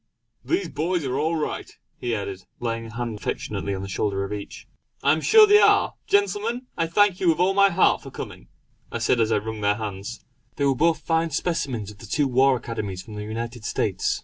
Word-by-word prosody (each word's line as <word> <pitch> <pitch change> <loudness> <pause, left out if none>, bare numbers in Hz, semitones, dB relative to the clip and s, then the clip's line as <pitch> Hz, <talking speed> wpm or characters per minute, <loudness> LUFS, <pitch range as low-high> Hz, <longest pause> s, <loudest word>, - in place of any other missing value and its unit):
"These 355 +4 -1
boys 165 +1 -1
are 130 +1 -1
all 160 +3 +1
right!" 155 - -3 0.3
he 120 -2 -1
added, 95 -2 -6
laying 115 -1 -3
a 110 - -11
hand 115 -3 -4
affectionately 100 -1 -3
on 95 - -5
the - - -5
shoulder 100 0 -1
of 100 - -4
each. 105 -1 -8 0.4
"I 140 - +5
am 155 +1 +1
sure 440 - +7
they 415 0 +6
are! - - +4
Gentlemen, 205 +5 +1
I 165 - 0
thank 195 +2 +3
you 180 - +3
with 160 - +3
all 185 +2 +3
my 200 0 +5
heart 185 0 +3
for - - -9
coming!" - - -8 0.4
I - - -2
said 125 - +1
as 115 -1 +2
I - - +3
wrung 110 +1 -5
their 100 0 +2
hands. 105 +1 -6 0.3
They 140 - 0
were 135 - +4
both 165 +5 +2
fine 165 0 +1
specimens 135 - -2
of 105 - -16
the 115 - -11
two 140 +7 +1
war 130 +1 +4
Academies 100 -6 -5
of 110 - -9
the 105 - -5
United 115 +2 -5
States. - - -1
125 Hz, 220 wpm, -24 LUFS, 105-170 Hz, 0.4 s, sure